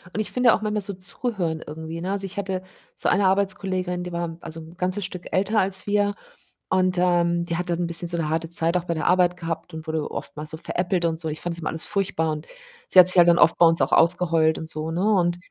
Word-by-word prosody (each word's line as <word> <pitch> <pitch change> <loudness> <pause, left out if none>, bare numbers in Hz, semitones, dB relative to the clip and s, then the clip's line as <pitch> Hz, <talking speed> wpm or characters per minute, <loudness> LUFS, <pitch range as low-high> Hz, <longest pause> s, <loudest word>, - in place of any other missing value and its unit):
und - - -2
ich 215 - -2
finde 250 -1 +4
auch - - -1
manchmal 210 0 -1
so 200 +1 -5
zuhören 185 -3 -3
irgendwie, 160 +2 -7
ne? 185 +3 -3
Also, 200 -1 -2
ich 195 +1 -8
hatte 190 -2 -3 0.3
so - - -2
eine 200 -1 +3
Arbeitskollegin, 190 -2 -1
die 180 - -6
war, 170 -1 -3
also, 165 0 -8
'n 160 +2 -13
ganzes 185 +2 -1
Stück 180 -1 -7
älter 200 +3 +1
als 190 0 +1
wir 205 0 +1 0.5
und, 185 -1 +1
ähm, 175 -1 +2
die 170 - -2
hat 180 0 -3
dann 170 0 -1
'n 175 - -1
bisschen 170 +1 +2
so 170 - +2
'ne 160 -2 -2
harte 165 +1 -2
Zeit 170 +1 +1
auch 175 - -4
bei 170 - -2
der 155 - -3
Arbeit 180 -1 +3
gehabt 165 0 -5
und 160 - -8
wurde 160 -1 -3
oftmals 150 +1 -6
so 160 - -6
veräppelt 175 +1 -1
und 160 -1 -1
so. 160 - -2
Ich 155 0 -5
fand 175 - -3
das 170 - -7
immer 160 - -3
alles 160 - -4
furchtbar 195 -6 -1
und 155 0 -6 0.4
sie - - -1
hat 180 - +9
sich 185 - +6
halt 175 -1 +7
dann 170 - +5
oft 165 - +5
bei 175 - +7
uns 165 0 +2
auch - - -1
ausgeheult 165 -2 +3
und 160 - -6
so, 155 0 -4
ne? 175 +3 -1
Und, 175 -3 +2
175 Hz, 265 wpm, -23 LUFS, 165-185 Hz, 0.5 s, hat